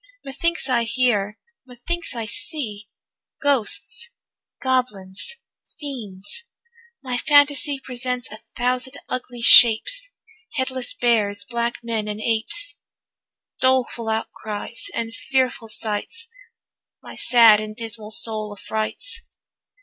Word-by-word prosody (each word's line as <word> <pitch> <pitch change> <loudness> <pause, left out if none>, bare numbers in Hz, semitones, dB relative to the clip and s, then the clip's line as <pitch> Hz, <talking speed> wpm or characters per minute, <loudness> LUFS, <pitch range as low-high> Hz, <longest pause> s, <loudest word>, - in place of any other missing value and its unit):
Methinks 335 +3 -1
I 240 -3 +2
hear, 225 -4 0 0.3
methinks 260 +6 -5
I 230 -1 -3
see 215 -4 -6 0.5
Ghosts, 285 - +1 0.5
goblins, 250 - -1 0.4
fiends; 240 - -6 0.6
my 250 -2 -2
phantasy 285 0 +4
Presents 250 -1 -3
a 215 - -8
thousand 250 +4 -2
ugly 250 -1 -5
shapes, 245 - +7 0.5
Headless 260 -2 -1
bears, 205 -4 +1
black 235 +1 -3
men, 225 -2 -2
and 210 0 -4
apes, 230 - 0 0.8
Doleful 255 -3 +1
outcries, 220 - -3
and 225 0 -3
fearful 255 -2 -1
sights, 220 - -2 0.8
My - - -10
sad 230 -4 +6
and 215 0 -6
dismal 225 -2 -3
soul 215 -1 +3
affrights. 220 - -4
240 Hz, 100 wpm, -22 LUFS, 215-260 Hz, 0.8 s, shapes